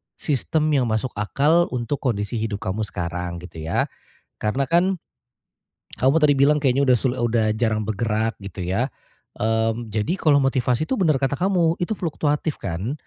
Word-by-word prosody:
sistem 155 +2 0
yang 130 -5 +2
masuk 110 +3 -1
akal 150 +11 +3
untuk 120 +3 -2
kondisi 115 -2 -1
hidup 110 -2 -3
kamu 95 +4 -2
sekarang 90 0 -4
gitu 85 -2 -10
ya, - - +2 0.5
karena 130 +6 -1
kan. 180 +1 +2 1.0
Kamu 135 +5 +3
tadi 145 -2 +5
bilang 145 +2 +4
kayaknya 135 +1 +3
udah 130 -2 +5
sul 130 -1 0
udah 120 -2 +1
jarang 110 -2 +1
bergerak 110 +1 -1
gitu 100 -1 -7
ya, 95 +8 0 0.5
mmm, 115 +1 0
jadi 110 - -1
kalau 150 -3 +4
motivasi 130 0 +1
itu - - 0
bener 160 -6 +3
kata 135 +1 0
kamu 175 0 +2
itu 210 +5 -1
fluktuatif 150 -3 -1
kan, 95 +7 -3
125 Hz, 160 wpm, -23 LUFS, 110-150 Hz, 1.0 s, tadi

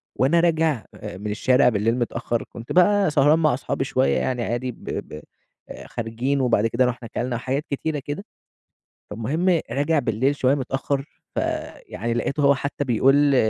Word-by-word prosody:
وأنا 140 +7 +3
راجع 160 - +1
آآ - - -8
من 105 +2 -4
الشارع 125 +5 +4
بالليل 110 +1 +1
متأخر، 120 -1 -2
كنت 115 0 -10
بقى 195 0 +4
سهران 150 +2 +4
مع 155 -4 +3
اصحابي 130 - -2
شويّة 70 0 +1
يعني 120 - -1
عادي، 120 +3 -2
ب - - -17
ب 75 - -5 0.5
آآ، - - -9
خارجين 120 +4 -2
وبعد 115 -4 +2
كده 120 +3 +2
روُحنا 125 -1 -3
كَلنا 120 +2 -3
وحاجات 130 +5 -2
كتيرة 150 +2 -2
كده، 145 +7 -5 0.9
فالمهم 155 - 0
راجع 145 +3 +1
بالليل 130 +3 0
شويّة 135 0 +2
متأخر، 135 +1 -2 0.3
فيعني 115 +2 -3
لقيته 140 +5 -1
هو 140 0 +5
حتى 145 +1 -3
بيقول 135 +4 +4
130 Hz, 160 wpm, -23 LUFS, 115-145 Hz, 0.9 s, هو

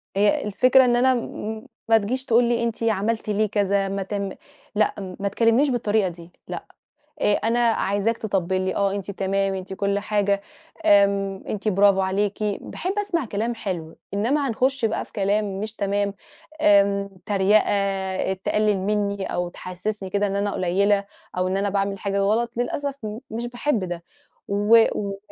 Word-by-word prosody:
هي 205 +1 +3
الفكرة 255 +5 +5
إن 240 -1 +3
أنا 260 +1 +4
م 220 0 -5 0.2
ما 225 - +7
تجيش 255 +6 -2
تقول 240 0 +4
لي 235 0 +1
أنتِ 230 0 -2
عملتِ 220 0 0
ليه 210 +1 +2
كذا، 200 -1 +1
ما 195 0 -2
تم 200 0 -3 0.5
لأ، 195 -3 -1
ما 200 - -1
تكلّمنيش 230 +7 +3
بالطريقة 215 -5 +1
دي 170 0 -12 0.2
لأ، - - -6 0.6
آآ 205 - +3
أنا 230 +2 +1
عايزاك 225 -1 +1
تطبِّل 190 -3 -1
لي 185 0 -1
آه، 200 -1 +2
أنتِ 200 0 -4
تمام 195 0 0
أنتِ 190 0 -6
كُلّ 200 0 0
حاجة، 200 -1 0 0.4
آمم، 200 -3 +3
أنتِ 210 +1 -2
برافو 200 0 +4
عليكِ، 200 +2 -1
باحب 210 - -3
أسمع 365 -8 0
كلام 225 +2 -2
حلو، 170 -7 -5 0.2
إنّما 270 +7 +1
هنخش 260 +2 0
بقى 220 - 0
في - - -21
كلام 200 -1 0
مش 215 0 -4
تمام، 200 0 -1 0.5
آمم، 200 -5 +4 0.2
تريقة، 195 -1 +1
تقلِّل 205 +1 +1
مني 200 0 -1
أو 175 0 -2
تحسِّسني 185 +3 -5
كده 205 +1 +1
إن 195 0 -2
أنا 200 0 0
قليّلة 200 +3 +2 0.3
أو 185 0 +1
إن 190 - 0
أنا 200 +1 0
باعمل 195 0 -1
حاجة 200 -1 -2
غلط، 220 +4 +1
للأسف 280 +3 -2
م 215 +1 -4
مش 235 +2 -3
باحب 245 -3 -1
ده 175 -1 -5 0.5
و 205 +3 +5 0.2
و 200 -1 -3
205 Hz, 165 wpm, -23 LUFS, 195-225 Hz, 0.6 s, ما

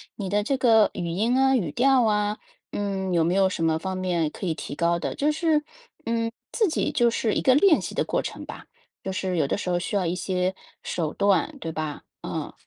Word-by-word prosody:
你 195 -3 -4
的 205 +2 +2
这 275 - +1
个 225 -4 +5
语 175 -3 -3
音 220 +9 +1
啊、 265 0 +4
语 170 -10 -2
调 265 0 +4
啊， 210 -1 +1 0.3
嗯， 195 -2 -2
有 170 -2 +3
没 175 +2 +1
有 195 -1 +4
什 165 -3 -2
么 160 -1 +2
方 190 +3 -4
面 175 -4 0
可 190 - -7
以 170 - 0
提 155 - -7
高 170 +2 +1
的。 - - -3
就 300 +2 +1
是 310 -1 +1 0.4
嗯， 230 0 -1 0.2
自 435 -5 +2
己 315 - -1
就 240 -1 +4
是 225 -1 0
一 - - +1
个 260 - +5
练 325 +2 +5
习 - - -5
的 - - 0
过 - - 0
程 - - -6
吧。 - - -10 0.4
就 190 - -3
是 185 -1 -2
有 160 -4 +2
的 - - 0
时 185 - -4
候 175 - +2
需 200 +4 -2
要 190 - 0
一 170 +1 -1
些 185 0 -1 0.3
手 160 -3 -3
段， 200 - +1
对 165 -7 -5
吧？ 155 -2 -4 0.2
嗯。 - - -4
195 Hz, 250 characters per minute, -25 LUFS, 175-240 Hz, 0.4 s, 个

